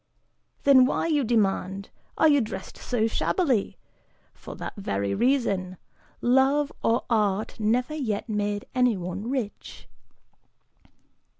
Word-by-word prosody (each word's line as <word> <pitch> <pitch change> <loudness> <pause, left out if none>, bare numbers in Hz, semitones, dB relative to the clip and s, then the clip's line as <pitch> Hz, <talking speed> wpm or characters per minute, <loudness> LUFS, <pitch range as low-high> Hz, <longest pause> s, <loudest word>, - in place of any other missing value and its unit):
Then 265 -2 +7
why, - - -1
you 300 -4 +1
demand, 200 -4 0 0.3
are 315 - +5
you 290 -2 +4
dressed 190 -4 -6
so 235 -3 -1
shabbily? 250 - 0 0.6
For - - -10
that - - -6
very 100 - -2
reason; 200 - 0 0.4
love 270 +4 +3
or 230 +1 +1
art 210 -2 0
never 240 +7 0
yet 240 -10 -3
made 205 -1 -2
anyone 205 -4 0
rich." 250 -6 -5
225 Hz, 110 wpm, -26 LUFS, 200-265 Hz, 0.6 s, Then